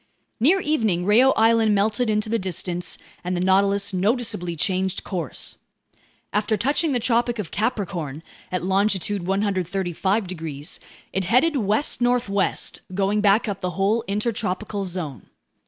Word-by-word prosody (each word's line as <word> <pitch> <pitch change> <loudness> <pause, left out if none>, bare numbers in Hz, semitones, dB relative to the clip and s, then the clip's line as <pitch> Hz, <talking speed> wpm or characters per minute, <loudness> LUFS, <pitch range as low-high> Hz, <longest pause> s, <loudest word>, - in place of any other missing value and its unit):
Near 325 - +4
evening 220 - +1
Reao 230 +6 +5
Island 225 -1 +4
melted 215 +4 +1
into 215 0 0
the 230 +1 0
distance, 180 -1 -2 0.3
and 180 0 -2
the - - -1
Nautilus 195 +2 +2
noticeably 190 -3 0
changed 190 +3 0
course. 170 -8 -4 0.8
After 210 +1 +1
touching 285 - +2
the 250 - +1
Tropic 240 0 +1
of 210 -6 -5
Capricorn 185 - -2 0.3
at 180 -1 -2
longitude 195 -1 0
135 195 0 0
degrees, 160 -4 -6 0.3
it 190 -1 -1
headed 255 - +3
west 220 +3 +1
northwest, 240 -5 0
going 200 +2 +1
back 205 +3 +3
up 195 -2 -4
the 180 -1 -3
whole 205 +4 +2
intertropical 205 -1 -2
zone. 165 - -6
200 Hz, 135 wpm, -23 LUFS, 185-225 Hz, 0.8 s, Reao